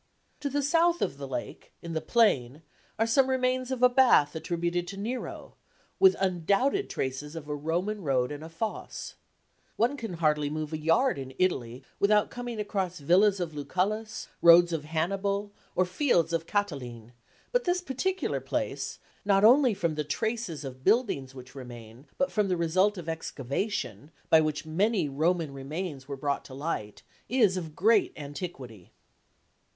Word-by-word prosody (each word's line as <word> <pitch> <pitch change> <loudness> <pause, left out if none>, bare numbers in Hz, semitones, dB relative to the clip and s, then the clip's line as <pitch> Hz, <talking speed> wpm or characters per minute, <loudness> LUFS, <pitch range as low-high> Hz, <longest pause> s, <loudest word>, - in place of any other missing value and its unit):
To 290 -1 -2
the 285 +1 -1
south 335 +4 +3
of 140 - -3
the 140 - -5
lake, 125 -2 -6
in 170 -1 -5
the 160 - -1
plain, 155 - +2 0.3
are 225 - +2
some 260 +4 +3
remains 255 -1 0
of 260 -1 -2
a - - +10
bath 245 - +4
attributed 175 +1 -2
to 195 - -7
Nero, 235 +6 -5 0.5
with 380 -1 +7
undoubted 195 - +1
traces 135 +4 -4
of 155 -3 -7
a 150 - -3
Roman 175 +8 -2
road 130 -5 +1
and 145 +1 -6
a 160 - -8
fosse. 190 +7 -5 0.6
One 240 +6 +1
can 225 -7 -5
hardly 150 -3 +1
move 155 +1 -4
a 155 - -2
yard 165 - +2
in 130 -1 -8
Italy 130 -9 -1 0.2
without 210 +1 +3
coming 245 -2 -5
across 195 -4 -2
villas 190 +7 +4
of 170 -3 -3
Lucullus, 200 +9 -2
roads 170 0 +7
of 155 -2 -3
Hannibal, 195 +6 -1 0.2
or 185 - +3
fields 180 - +1
of 165 0 -1
Cataline, 125 - -3 0.4
but - - +1
this 355 0 +2
particular 370 +6 -1
place, - - -3 0.3
not 200 -1 +3
only 250 0 +6
from 170 -5 -1
the 150 0 -2
traces 220 - -3
of 130 -1 -8
buildings 140 - +1
which 130 0 -11
remain, 120 -1 -11
but 275 - +1
from 210 -2 +1
the 180 -2 0
result 185 +5 +2
of 170 -2 -7
excavation, 145 - -3 0.2
by 160 - +7
which 155 -1 -2
many 190 +3 +1
Roman 155 +2 0
remains 140 0 -5
were 140 -1 -5
brought 140 +1 -1
to 130 - -10
light, 135 -8 -4 0.3
is 225 -7 +3
of 160 -4 -5
great 215 +2 +3
antiquity. 140 - -8
175 Hz, 165 wpm, -28 LUFS, 145-215 Hz, 0.6 s, a